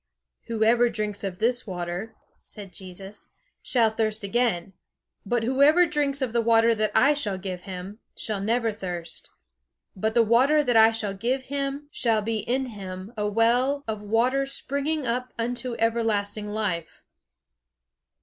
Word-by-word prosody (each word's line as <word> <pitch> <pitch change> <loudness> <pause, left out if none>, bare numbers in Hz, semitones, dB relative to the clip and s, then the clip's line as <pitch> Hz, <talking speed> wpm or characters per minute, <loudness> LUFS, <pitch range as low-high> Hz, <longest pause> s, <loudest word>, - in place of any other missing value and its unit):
"Whoever 230 +2 +3
drinks 210 -2 -3
of 190 -2 -4
this 240 +3 0
water," 180 +3 -5 0.3
said 200 -3 -11
Jesus, 190 +2 -11 0.3
"shall 230 -4 +2
thirst 220 -1 -2
again, 200 -4 0 0.5
but 240 +1 +1
whoever 280 +8 +5
drinks 285 -3 0
of 240 -3 -3
the 235 - +2
water 230 0 +4
that 215 -1 0
I 280 +3 +5
shall 215 -10 -2
give 185 -1 -6
him, 190 +3 -7 0.2
shall 210 -3 -3
never 225 +2 0
thirst; 175 -4 -7 0.7
but 220 +4 -1
the 235 - +6
water 260 +7 +4
that 245 -4 +1
I 225 0 +7
shall 215 -3 -2
give 245 +7 -1
him 280 +1 -2
shall 225 -3 +1
be 225 +1 -1
in 255 +5 -1
him 195 -2 -8
a 210 -1 -1
well 245 +6 +2
of 215 -2 -3
water 245 +6 +1
springing 280 +2 -2
up 250 +2 -2
unto 240 +1 -3
everlasting 215 -3 0
life." 200 -6 -3
225 Hz, 150 wpm, -25 LUFS, 205-250 Hz, 0.7 s, I